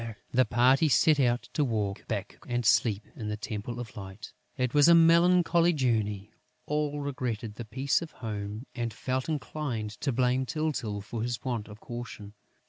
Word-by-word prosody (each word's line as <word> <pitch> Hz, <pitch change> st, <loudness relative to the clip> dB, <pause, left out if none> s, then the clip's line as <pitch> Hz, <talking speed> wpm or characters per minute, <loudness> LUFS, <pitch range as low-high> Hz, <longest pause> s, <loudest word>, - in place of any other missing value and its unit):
The 130 Hz, +1 st, +4 dB
party 130 Hz, +7 st, +4 dB
set 150 Hz, +2 st, +4 dB
out 120 Hz, -2 st, +1 dB
to 150 Hz, -, +2 dB
walk 105 Hz, -6 st, -2 dB
back -, -, -4 dB
and 120 Hz, -1 st, -1 dB
sleep 105 Hz, -1 st, +3 dB
in 110 Hz, -, -6 dB
the 105 Hz, -, -3 dB
Temple 110 Hz, +3 st, -5 dB
of 120 Hz, -2 st, -7 dB
Light. 95 Hz, 0 st, -9 dB, 0.2 s
It 125 Hz, -1 st, 0 dB
was 145 Hz, +1 st, +6 dB
a 170 Hz, -, +8 dB
melancholy 170 Hz, +1 st, +5 dB
journey; 110 Hz, -7 st, 0 dB, 0.3 s
all 150 Hz, -1 st, -1 dB
regretted 125 Hz, -6 st, -3 dB
the 115 Hz, +2 st, -7 dB
peace 135 Hz, +7 st, 0 dB
of 165 Hz, -, -6 dB
home 105 Hz, 0 st, -5 dB
and 120 Hz, -2 st, -3 dB
felt 130 Hz, +3 st, -2 dB
inclined 140 Hz, -8 st, -3 dB
to 140 Hz, -, 0 dB
blame 125 Hz, +1 st, +1 dB
Tyltyl 135 Hz, -10 st, -2 dB
for 110 Hz, +3 st, -5 dB
his 120 Hz, +1 st, -3 dB
want 120 Hz, -5 st, -2 dB
of 105 Hz, 0 st, -11 dB
caution. 120 Hz, -4 st, -8 dB
120 Hz, 170 wpm, -29 LUFS, 110-145 Hz, 0.3 s, a